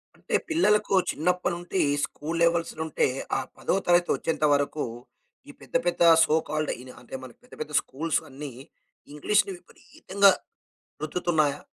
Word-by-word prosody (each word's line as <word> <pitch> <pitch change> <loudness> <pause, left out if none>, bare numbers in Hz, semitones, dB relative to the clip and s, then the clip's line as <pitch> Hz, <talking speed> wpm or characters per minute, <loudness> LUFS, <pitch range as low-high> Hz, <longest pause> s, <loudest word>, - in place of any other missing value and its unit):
అంటే - - -3
పిల్లలకు 210 -12 +2 0.2
చిన్నప్పటి 180 +3 0
నుండి 175 +2 -2 0.2
స్కూల్ 160 +3 -4
లెవెల్స్‌‌లుంటే 165 -3 +1 0.3
ఆ - - 0 0.2
పదో - - 0
తరగతి 175 0 +4
వచ్చేంత 155 -1 -1
వరకు, 145 +1 0 0.7
ఈ - - -7
పెద్ద, - - -13
పెద్ద 175 0 -1 0.2
సో 155 - +2
కాల్డ్ 155 0 -1
ఇనా 130 0 -11
అంటే 125 - -9
మనకి 125 - -12
పెద్ద, 250 - -20
పెద్ద 150 0 -5
స్కూల్స్ 155 +4 -2
అన్నీ, 140 +1 -7 0.6
ఇంగ్లీష్‌ని 200 +6 +1
విపరీతంగా 195 +2 +1 0.7
రుద్దుతున్నాయా? 155 -3 0
165 Hz, 135 wpm, -26 LUFS, 150-180 Hz, 0.7 s, తరగతి